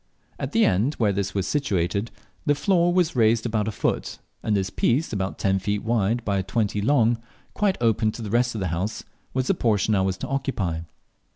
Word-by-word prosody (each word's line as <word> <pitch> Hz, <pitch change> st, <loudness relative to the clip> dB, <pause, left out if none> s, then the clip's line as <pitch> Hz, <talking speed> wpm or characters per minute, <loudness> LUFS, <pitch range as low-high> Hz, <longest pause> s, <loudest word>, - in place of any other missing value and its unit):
At -, -, -3 dB
the 225 Hz, 0 st, +4 dB
end 110 Hz, +11 st, +2 dB
where 105 Hz, -4 st, +1 dB
this 100 Hz, 0 st, -2 dB
was 95 Hz, -2 st, 0 dB
situated 100 Hz, -, 0 dB, 0.4 s
the 145 Hz, -, +4 dB
floor 175 Hz, +3 st, +2 dB
was 175 Hz, -3 st, +2 dB
raised 115 Hz, -1 st, +3 dB
about 110 Hz, -2 st, 0 dB
a -, -, 0 dB
foot, -, -, -2 dB, 0.2 s
and 105 Hz, -, 0 dB
this 95 Hz, 0 st, -2 dB
piece, 130 Hz, +3 st, +1 dB
about 95 Hz, -2 st, -2 dB
ten 95 Hz, -1 st, +1 dB
feet 105 Hz, +2 st, -2 dB
wide 115 Hz, +1 st, 0 dB
by 100 Hz, -2 st, +1 dB
twenty 100 Hz, +1 st, -1 dB
long, 120 Hz, -1 st, +3 dB, 0.3 s
quite 205 Hz, -3 st, +1 dB
open 115 Hz, -2 st, +2 dB
to 115 Hz, -, -7 dB
the 105 Hz, -, -5 dB
rest 120 Hz, +1 st, +2 dB
of 105 Hz, -, -3 dB
the 95 Hz, -, -1 dB
house, 95 Hz, +6 st, -3 dB, 0.3 s
was 130 Hz, -1 st, +1 dB
the 195 Hz, -, +3 dB
portion 110 Hz, -, +1 dB
I 95 Hz, -, +3 dB
was 95 Hz, 0 st, 0 dB
to -, -, -5 dB
occupy. 130 Hz, -, -1 dB
110 Hz, 205 wpm, -24 LUFS, 100-125 Hz, 0.4 s, the